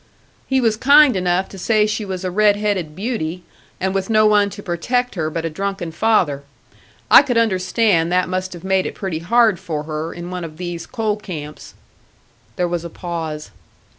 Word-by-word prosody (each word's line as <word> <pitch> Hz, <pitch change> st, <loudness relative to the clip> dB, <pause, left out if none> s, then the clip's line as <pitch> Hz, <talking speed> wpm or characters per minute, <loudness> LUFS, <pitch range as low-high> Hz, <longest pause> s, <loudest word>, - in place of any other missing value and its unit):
"He 265 Hz, -1 st, +2 dB
was 225 Hz, -4 st, +1 dB
kind 285 Hz, +1 st, +6 dB
enough 180 Hz, 0 st, 0 dB
to 195 Hz, -, -10 dB
say 215 Hz, +2 st, +2 dB
she 215 Hz, 0 st, -2 dB
was 190 Hz, -1 st, -5 dB
a 185 Hz, -, -2 dB
red 210 Hz, +2 st, +4 dB
headed 200 Hz, -7 st, -2 dB
beauty, 185 Hz, -5 st, -3 dB, 0.4 s
and 190 Hz, 0 st, -1 dB
with 195 Hz, +1 st, -2 dB
no 215 Hz, -1 st, +4 dB
one 210 Hz, -1 st, +4 dB
to 205 Hz, +1 st, -10 dB
protect 245 Hz, +8 st, -1 dB
her 160 Hz, -4 st, -2 dB
but 165 Hz, +1 st, -4 dB
a -, -, -1 dB
drunken 195 Hz, -1 st, -4 dB
father. 160 Hz, -8 st, +1 dB, 0.7 s
I -, -, +10 dB
could 245 Hz, -3 st, -1 dB
understand 190 Hz, -4 st, +2 dB
that 180 Hz, 0 st, +2 dB
must 185 Hz, 0 st, -3 dB
have 175 Hz, -, -10 dB
made 190 Hz, 0 st, +1 dB
it -, -, -7 dB
pretty 185 Hz, -5 st, -4 dB
hard 220 Hz, +2 st, +3 dB
for 155 Hz, -3 st, -4 dB
her, 155 Hz, +1 st, -4 dB
in 175 Hz, +1 st, -8 dB
one 180 Hz, -1 st, -4 dB
of 155 Hz, -2 st, -8 dB
these 175 Hz, -1 st, -5 dB
coal 220 Hz, -3 st, -1 dB
camps." 155 Hz, -8 st, -8 dB, 0.8 s
There 180 Hz, -, 0 dB
was 170 Hz, -1 st, -3 dB
a 170 Hz, -, -6 dB
pause. 160 Hz, -, -5 dB
185 Hz, 195 wpm, -19 LUFS, 170-215 Hz, 0.8 s, I